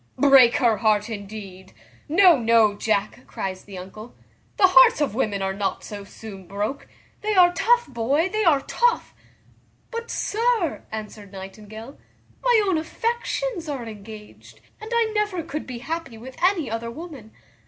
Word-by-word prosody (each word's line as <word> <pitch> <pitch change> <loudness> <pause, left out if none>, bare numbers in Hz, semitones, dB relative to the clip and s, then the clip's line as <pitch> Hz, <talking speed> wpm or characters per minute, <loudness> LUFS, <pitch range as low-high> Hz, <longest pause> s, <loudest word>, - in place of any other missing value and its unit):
"Break 265 -3 +6
her 235 -5 +2
heart, 215 +1 +1
indeed! 200 -3 -9 0.4
no, 360 +2 +6
no, 230 -4 +3
Jack," 210 0 -2
cries 185 -1 -5
the 195 -2 -10
uncle, 215 +6 -10 0.4
"the 385 - +6
hearts 355 -4 +6
of 295 -7 0
women 210 -5 -1
are 190 0 -1
not 195 0 -3
so 205 -1 -8
soon 200 -2 -11
broke; 210 +9 -4 0.3
they 425 0 -1
are 355 -1 +6
tough, 475 +7 +2
boy, 270 +6 0
they 430 +3 -1
are 305 -7 +4
tough." 480 - 0 0.8
"But, 465 0 -5
sir," 450 -5 0
answered 210 -2 -8
Nightingale, 215 +5 -10 0.4
"my 480 -4 +4
own 370 -5 +1
affections 460 0 -3
are 265 -5 -4
engaged, 215 -1 -12 0.2
and 435 - -8
I 465 -2 +1
never 415 -5 -1
could 305 -1 -6
be 250 -2 -6
happy 295 -2 -5
with 255 +3 -11
any 360 -5 +2
other 230 +1 -4
woman. 280 -4 -10
250 Hz, 155 wpm, -23 LUFS, 210-355 Hz, 0.8 s, Break